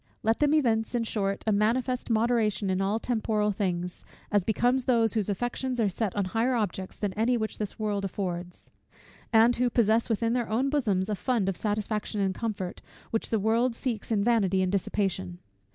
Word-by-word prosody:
Let 225 +1 +2
them 295 0 +3
evince, 230 -5 +1
in 235 - +1
short, 200 -3 -2
a 220 - +2
manifest 240 +5 +1
moderation 220 -3 +1
in 185 +1 0
all 200 +3 +1
temporal 220 -3 0
things; 180 -3 -3 0.3
as 205 -2 +3
becomes 245 +5 +1
those 230 -3 +3
whose 215 -3 0
affections 245 +4 -2
are 215 -3 +3
set 195 +1 -2
on 200 -2 0
higher 225 +7 +1
objects 190 -4 -3
than 205 -3 -2
any 235 +4 +1
which 220 -1 -4
this 210 -2 -3
world 210 -2 -1
affords, 180 -2 -5 0.6
and 230 +1 +5
who 250 0 +2
possess, 230 0 +2
within 230 +1 +1
their 245 -2 -1
own 255 +5 +1
bosoms, 205 -10 +1
a 215 - -1
fund 225 -1 0
of 195 - 0
satisfaction 210 +1 -2
and 195 -1 +1
comfort, 195 -4 -4 0.3
which 225 - -1
the 225 - +1
world 230 +4 +1
seeks 235 -4 -4
in 205 -2 +2
vanity 195 -5 +2
and 185 - 0
dissipation. 190 - -1
220 Hz, 185 wpm, -28 LUFS, 195-235 Hz, 0.6 s, and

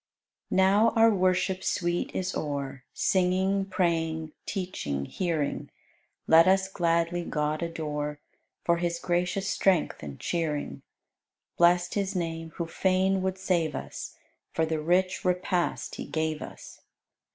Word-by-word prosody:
93. - - 0
Now 205 +4 +5
our 225 0 +6
worship 185 0 +1
sweet 175 0 0
is 185 0 -1
o'er 140 -3 -3
Singing, 190 +1 +1
praying, 165 -4 0 0.2
teaching, 180 - -3
hearing: 160 - -2 0.6
Let 165 +2 +7
us 190 0 +4
gladly 170 -1 0
God 150 -1 -1
adore 150 -3 -3 0.4
For 170 0 +3
His 170 0 -1
gracious 180 +3 -1
strength 190 -5 +1
and 70 -2 -8
cheering. 160 -4 -2 0.7
Blest 175 +1 +4
His 200 -1 -1
name, 165 -2 -3
who 170 - -2
fain 190 +2 +1
would 190 0 -1
save 170 -6 0
us, - - -7 0.4
For 160 - +1
the 160 0 -1
rich 180 +4 +1
repast 180 -1 0
He - - -5
gave 160 -1 -2
us. - - -10
175 Hz, 130 wpm, -28 LUFS, 160-185 Hz, 0.7 s, Let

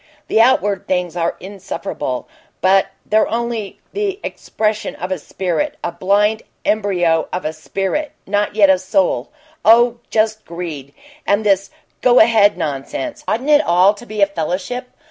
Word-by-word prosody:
The 225 - +4
outward 205 -6 +2
things 180 -2 -1
are 170 -1 -1
insufferable, 190 -8 -5 0.3
but 190 +1 +4 0.2
they're 215 +1 +3
only 230 -3 -3
the 400 -1 -2
expression 215 -1 -2
of 180 +2 -5
a 185 - -1
spirit 175 0 -2
a 175 - -2
blind 205 +5 +1 0.2
embryo 180 -6 +1
of 180 - -4
a 155 - -2
spirit, 195 - -3
not 205 +1 -1
yet 200 -3 +6
a 185 - +3
soul 190 +11 0 0.3
oh, 235 +2 +5
just 220 0 +1
greed! 160 -5 -7 0.3
And 205 +2 +2
this 195 -1 +2 0.3
'go 250 -1 +4
ahead' 220 -3 +5
nonsense! 155 - -4
Oughtn't 255 +7 0
it 295 0 +7
all 185 - +4
to 235 +3 -13
be 215 -1 0
a - - +8
fellowship? 195 - -3
200 Hz, 150 wpm, -18 LUFS, 180-220 Hz, 0.3 s, a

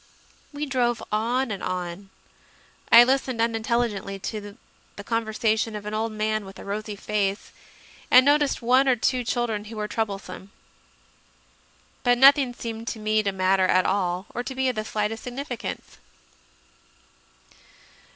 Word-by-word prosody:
We 295 0 -4
drove 245 -4 0
on 235 +4 0
and 200 - -4
on; 180 +2 -4 0.8
I 235 - +10
listened 260 -1 0
unintelligently 225 -3 -1
to 205 0 -6 0.4
the 200 - -8
conversation 220 0 -1
of 210 -1 -7
an 210 - -5
old 220 +1 -1
man 215 0 -1
with 195 -1 -11
a - - -10
rosy 210 +1 -4
face, 200 0 -2 0.6
and 255 +1 +7
noticed 290 -3 +2
one 255 +3 +4
or 260 - +4
two 250 +2 0
children 230 -3 -2
who 220 +1 -9
were 210 -1 -3
troublesope. 200 -4 -4 1.5
But 245 -1 +3
nothing 270 -1 +6
seemed 230 -1 -6
to 225 - -4
me 215 0 +1
to 200 -2 -1
matter 190 0 +2
at 185 0 +3
all 185 -1 0
or 245 - -2
to 260 +1 -6
be 265 0 +1
of 250 - -3
the 215 - -2
slightest 215 +1 -2
significance. 250 0 -6
220 Hz, 145 wpm, -25 LUFS, 205-245 Hz, 1.5 s, I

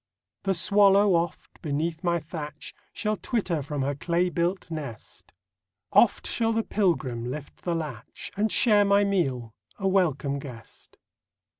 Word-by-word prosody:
The 195 -1 +2
swallow, 200 +2 +5
oft, 170 0 -2
beneath 160 +3 -2
my 170 -1 +2
thatch 150 -2 -7 0.2
Shall 215 -1 -2
twitter 190 - -1
from 145 0 -3
her 140 +2 0
clay 170 +6 0
built 175 +2 -2
nest; 145 -9 -8 0.6
Oft - - +4
shall 225 -1 +1
the 225 0 0
pilgrim 130 - 0
lift 145 +2 -8
the 175 -1 0
latch, 150 -9 -6
And 210 +2 0
share 210 -4 +5
my 200 0 +4
meal, 135 - -1 0.2
a 195 - -1
welcome 150 -7 +1
guest. 125 -5 -12
170 Hz, 140 wpm, -26 LUFS, 145-195 Hz, 0.6 s, swallow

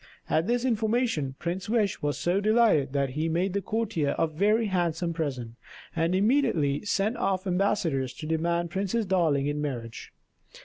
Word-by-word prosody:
At 160 +4 +2
this 240 +1 +1
information 220 - 0
Prince 175 +4 -4
Wish 215 -6 +1
was 145 -1 -1
so 180 +3 0
delighted 215 - +3
that 140 -2 0
he 155 +4 -1
made 180 +3 0
the 200 - 0
courtier 195 -10 -1
a - - +3
very 205 +8 +1
handsome 175 -3 -1
present, 130 -8 -4 0.4
and 165 +2 +1
immediately 195 - +2
sent 210 +2 0
off 190 0 -1
ambassadors 180 -8 0
to 155 - -8
demand 170 +2 -1
Princess 200 +4 -1
Darling 165 -7 +2
in 145 +1 -2
marriage. 120 -6 -5
175 Hz, 160 wpm, -27 LUFS, 150-205 Hz, 0.4 s, delighted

